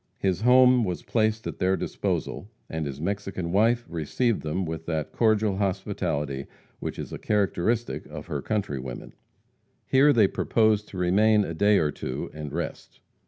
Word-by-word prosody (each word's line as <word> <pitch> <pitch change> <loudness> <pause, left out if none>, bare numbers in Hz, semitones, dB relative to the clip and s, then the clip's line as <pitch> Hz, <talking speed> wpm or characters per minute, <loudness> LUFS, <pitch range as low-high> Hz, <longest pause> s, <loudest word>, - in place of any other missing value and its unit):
His 95 -1 0
home 125 0 +6
was 90 -4 -3
placed 110 -1 0
at - - -5
their 95 +1 +2
disposal, 100 - -3 0.2
and 80 -2 -2
his 70 0 -6
Mexican 95 -1 -3
wife 115 +5 +3
received 85 - -1
them 85 +5 -2
with 80 0 -6
that 80 -3 -2
cordial 110 -3 +2
hospitality 90 -8 -2 0.3
which - - -5
is - - -6
a - - -5
characteristic 105 +2 0
of - - -8
her 70 -2 -3
countrywomen. 70 - -4 0.7
Here 140 +3 +5
they 110 -7 +5
proposed 110 0 +1
to 95 - -9
remain 105 +4 +4
a 85 - -4
day 100 +5 +4
or 75 -4 +2
two 65 - -5
and 75 -2 -6
rest. - - -5
95 Hz, 160 wpm, -26 LUFS, 80-110 Hz, 0.7 s, home